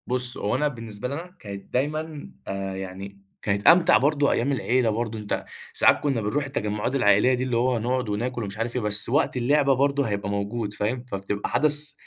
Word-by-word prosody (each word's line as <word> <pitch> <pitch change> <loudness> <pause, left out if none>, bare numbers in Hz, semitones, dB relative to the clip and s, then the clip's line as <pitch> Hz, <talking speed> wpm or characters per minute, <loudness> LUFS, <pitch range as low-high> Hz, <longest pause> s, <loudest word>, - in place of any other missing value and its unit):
بُصّ، 125 -1 +4
هو 105 +4 -1
أنا 150 +3 +1
بالنسبة 115 -3 -6
لي 130 - -5
أنا 175 +5 -8
كانت 100 -2 -9
دايمًا، 150 - -3 0.2
آآ 95 0 -4
يعني 95 +1 -8 0.2
كانت 100 0 -1
أمتع 170 +1 +7
برضه 145 +1 +2
أيام 130 +4 0
العيلة 125 -2 +1
برضه، 110 0 -3
أنت 105 -1 -4 0.3
ساعات - - +4
كنّا 135 -6 -1
بنرُوح 135 +8 -1
التجمُّعات 105 -2 -3
العائلية 105 0 +4
دي، 125 0 -1
اللي 125 -2 -1
هو 125 0 +1
نقعُد 125 +1 -2
وناكُل 120 +3 -3
ومش 100 0 -6
عارف 115 +2 -3
إيه، 125 - 0
بس 105 0 +4
وقت 140 0 +1
اللعبة 140 +3 +3
برضه 140 +2 +1
هيبقى 100 -1 -3
موجود 100 +1 -3
فاهم، 115 +4 -2
فبتبقى 100 -3 -4
حدَث 150 -1 +3
120 Hz, 195 wpm, -24 LUFS, 105-140 Hz, 0.3 s, أمتع